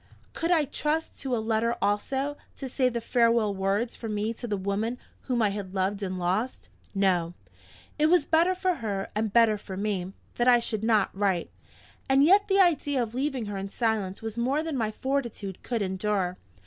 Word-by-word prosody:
Could 330 Hz, -, -2 dB
I 325 Hz, -4 st, +4 dB
trust 300 Hz, +3 st, -2 dB
to 265 Hz, -3 st, -1 dB
a -, -, 0 dB
letter 225 Hz, +1 st, 0 dB
also, 265 Hz, +8 st, 0 dB, 0.2 s
to 270 Hz, -, -6 dB
say 255 Hz, 0 st, +1 dB
the 235 Hz, -1 st, -2 dB
farewell 230 Hz, -3 st, +2 dB
words 200 Hz, +5 st, -1 dB
for 225 Hz, -, -6 dB
me 210 Hz, +2 st, -1 dB
to 240 Hz, +1 st, -7 dB
the 205 Hz, -2 st, -1 dB
woman 200 Hz, +5 st, -2 dB, 0.3 s
whom 245 Hz, -3 st, +1 dB
I 210 Hz, -, +4 dB
had 200 Hz, -1 st, -5 dB
loved 195 Hz, +2 st, 0 dB
and 185 Hz, -2 st, -3 dB
lost? 190 Hz, +8 st, -2 dB, 0.3 s
No! 180 Hz, -3 st, +1 dB, 0.6 s
It 305 Hz, -, +5 dB
was 340 Hz, -2 st, +4 dB
better 340 Hz, +3 st, +3 dB
for 365 Hz, -1 st, 0 dB
her, 200 Hz, -4 st, -3 dB
and 215 Hz, 0 st, -1 dB
better 225 Hz, -1 st, +4 dB
for 190 Hz, -2 st, -8 dB
me, 195 Hz, -3 st, -2 dB, 0.3 s
that 240 Hz, -, +2 dB
I 245 Hz, -1 st, +8 dB
should 220 Hz, -2 st, -2 dB
not 220 Hz, -4 st, +2 dB
write. 195 Hz, -4 st, 0 dB, 0.6 s
And 270 Hz, +1 st, +5 dB
yet 395 Hz, +6 st, +5 dB
the 390 Hz, 0 st, +3 dB
idea 290 Hz, -7 st, +3 dB
of 225 Hz, -1 st, -6 dB
leaving 265 Hz, -2 st, -1 dB
her 205 Hz, -1 st, -4 dB
in 195 Hz, +1 st, -5 dB
silence 215 Hz, -3 st, -1 dB
was 225 Hz, +1 st, -4 dB
more 270 Hz, +6 st, +1 dB
than 320 Hz, -3 st, -3 dB
my 225 Hz, -4 st, 0 dB
fortitude 235 Hz, -5 st, -3 dB
could 235 Hz, -4 st, -2 dB
endure. 190 Hz, -1 st, -1 dB
225 Hz, 195 wpm, -27 LUFS, 200-265 Hz, 0.6 s, I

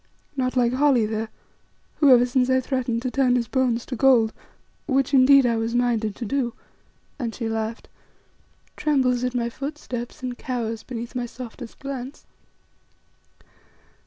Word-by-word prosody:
Not 255 Hz, -1 st, -1 dB
like 240 Hz, -1 st, +3 dB
Holly 260 Hz, -4 st, +3 dB
there, 220 Hz, +1 st, -3 dB, 0.7 s
who, 290 Hz, -, +5 dB
ever 245 Hz, -1 st, +7 dB
since 250 Hz, 0 st, +1 dB
I 260 Hz, 0 st, +4 dB
threatened 250 Hz, -3 st, -2 dB
to 255 Hz, -, -2 dB
turn 255 Hz, -2 st, +3 dB
his 235 Hz, -2 st, 0 dB
bones 245 Hz, -2 st, 0 dB
to 255 Hz, -, -5 dB
gold 235 Hz, -3 st, +4 dB, 0.5 s
which, 270 Hz, -1 st, +1 dB
indeed, 270 Hz, 0 st, +7 dB
I 235 Hz, -1 st, +2 dB
was 225 Hz, +1 st, -2 dB
minded 230 Hz, -4 st, +1 dB
to 240 Hz, -, -5 dB
do," 245 Hz, 0 st, -1 dB, 0.6 s
and 235 Hz, -4 st, -3 dB
she 230 Hz, -, -3 dB
laughed 225 Hz, 0 st, -3 dB, 0.9 s
"trembles 260 Hz, -5 st, +1 dB
at 250 Hz, 0 st, -1 dB
my 235 Hz, -1 st, 0 dB
footsteps 255 Hz, -2 st, -6 dB
and 250 Hz, -1 st, -4 dB
cowers 230 Hz, -3 st, -3 dB
beneath 235 Hz, -1 st, -7 dB
my 245 Hz, -1 st, -3 dB
softest 240 Hz, -1 st, -9 dB
glance. 270 Hz, 0 st, -7 dB
245 Hz, 150 wpm, -24 LUFS, 235-260 Hz, 0.9 s, ever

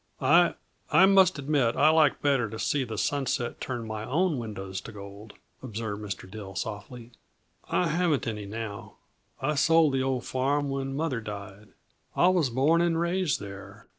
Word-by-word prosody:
"I 170 Hz, +6 st, +5 dB, 0.4 s
I 155 Hz, +6 st, +7 dB
must 190 Hz, -3 st, +5 dB
admit 140 Hz, -4 st, +1 dB
I 145 Hz, +3 st, +5 dB
like 155 Hz, -3 st, +3 dB
better 135 Hz, -6 st, +2 dB
to 110 Hz, -, -7 dB
see 140 Hz, +4 st, 0 dB
the 115 Hz, -3 st, -6 dB
sunset 135 Hz, -1 st, -1 dB
turn 120 Hz, -3 st, -4 dB
my 110 Hz, -1 st, -5 dB
own 155 Hz, +4 st, 0 dB
windows 95 Hz, -4 st, -6 dB
to -, -, -9 dB
gold," 100 Hz, +1 st, -11 dB, 0.3 s
observed 110 Hz, -4 st, -5 dB
Mr. 100 Hz, -3 st, -6 dB
Dill 95 Hz, -1 st, -9 dB
softly. 115 Hz, +4 st, -6 dB, 0.6 s
"I 180 Hz, -, +1 dB
haven't 160 Hz, -4 st, +1 dB
any, 105 Hz, -4 st, -4 dB
now; 105 Hz, -1 st, -7 dB, 0.5 s
I 150 Hz, +3 st, +1 dB
sold 160 Hz, 0 st, +4 dB
the 135 Hz, -, +1 dB
old 130 Hz, -2 st, -1 dB
farm 140 Hz, +2 st, 0 dB
when 135 Hz, 0 st, -3 dB
mother 140 Hz, -6 st, -1 dB
died. 100 Hz, -1 st, -8 dB, 0.5 s
I 180 Hz, -, +5 dB
was 175 Hz, -7 st, +2 dB
born 145 Hz, +8 st, +3 dB
and 170 Hz, -1 st, +1 dB
raised 170 Hz, -3 st, 0 dB
there. 100 Hz, -1 st, -10 dB
130 Hz, 165 wpm, -27 LUFS, 105-155 Hz, 0.6 s, I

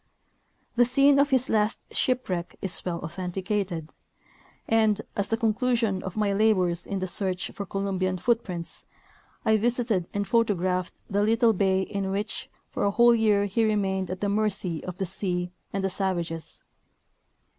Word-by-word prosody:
The 245 Hz, -, +6 dB
scene 275 Hz, +3 st, +5 dB
of 285 Hz, 0 st, +4 dB
his 260 Hz, -2 st, +2 dB
last 215 Hz, 0 st, +1 dB
shipwreck 195 Hz, -9 st, -1 dB
is 190 Hz, -2 st, -1 dB
well 170 Hz, -2 st, -3 dB
authenticated, 180 Hz, 0 st, -3 dB, 0.7 s
and, 220 Hz, -2 st, +3 dB, 0.2 s
as 200 Hz, -1 st, 0 dB
the 225 Hz, -, +1 dB
conclusion 225 Hz, -3 st, +1 dB
of 190 Hz, +2 st, -6 dB
my 205 Hz, -2 st, +1 dB
labors 185 Hz, -5 st, +2 dB
in 195 Hz, -, -2 dB
the 185 Hz, -, -2 dB
search 185 Hz, 0 st, -2 dB
for 200 Hz, -, -6 dB
Columbian 190 Hz, -2 st, -1 dB
foot 235 Hz, +5 st, +1 dB
prints, 175 Hz, -3 st, -7 dB, 0.6 s
I 220 Hz, 0 st, +4 dB
visited 230 Hz, -5 st, +1 dB
and 205 Hz, -1 st, -2 dB
photographed 185 Hz, -5 st, +1 dB
the 205 Hz, 0 st, 0 dB
little 225 Hz, +1 st, +4 dB
bay 190 Hz, -1 st, +2 dB
in 195 Hz, 0 st, -3 dB
which 205 Hz, +3 st, -2 dB, 0.2 s
for -, -, -2 dB
a 200 Hz, -, +3 dB
whole 235 Hz, +3 st, +5 dB
year 210 Hz, -3 st, +3 dB
he 205 Hz, +3 st, 0 dB
remained 195 Hz, -3 st, 0 dB
at 185 Hz, +1 st, -5 dB
the 205 Hz, -, +1 dB
mercy 200 Hz, -5 st, -1 dB
of 180 Hz, -1 st, -6 dB
the 195 Hz, -, -1 dB
sea 180 Hz, -1 st, -2 dB, 0.2 s
and 195 Hz, -1 st, -2 dB
the -, -, +1 dB
savages. 170 Hz, -4 st, -3 dB
200 Hz, 160 wpm, -26 LUFS, 185-220 Hz, 0.7 s, The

